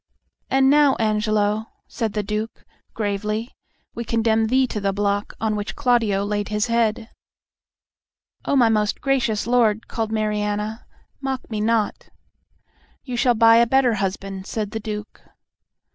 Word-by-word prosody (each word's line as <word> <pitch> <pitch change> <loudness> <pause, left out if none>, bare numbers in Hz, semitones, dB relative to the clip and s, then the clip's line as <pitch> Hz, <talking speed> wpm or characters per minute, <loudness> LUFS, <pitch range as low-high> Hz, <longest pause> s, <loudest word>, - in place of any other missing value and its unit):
"And 270 0 +3
now, 290 -1 +5
Angelo," 215 0 0 0.2
said 225 -4 -3
the 210 -1 -1
Duke, 210 +2 -4 0.3
gravely, 210 +2 -2 0.4
"we 235 - -4
condemn 225 -1 +1
thee 260 +3 +3
to 215 -4 -4
the 195 0 +1
block 205 +1 -1
on 220 -1 0
which 205 0 -4
Claudio 230 -7 +1
laid 205 0 -2
his 210 0 0
head!" 230 -1 0 1.3
"O - - +1
my 245 -4 +5
most 210 -2 +1
gracious 255 -6 0
lord," 230 -3 +2
cried 225 -2 -3
Mariana, 210 0 -2 0.3
"mock 270 -2 -4
me 215 -1 -2
not!" 220 -1 0 0.9
"You 250 -3 -5
shall 240 0 +3
buy 225 +1 +6
a 235 0 +5
better 260 -1 +3
husband," 195 -1 -4
said 210 -2 -3
the 220 - -3
Duke. 210 -1 -7
220 Hz, 145 wpm, -22 LUFS, 210-235 Hz, 1.3 s, buy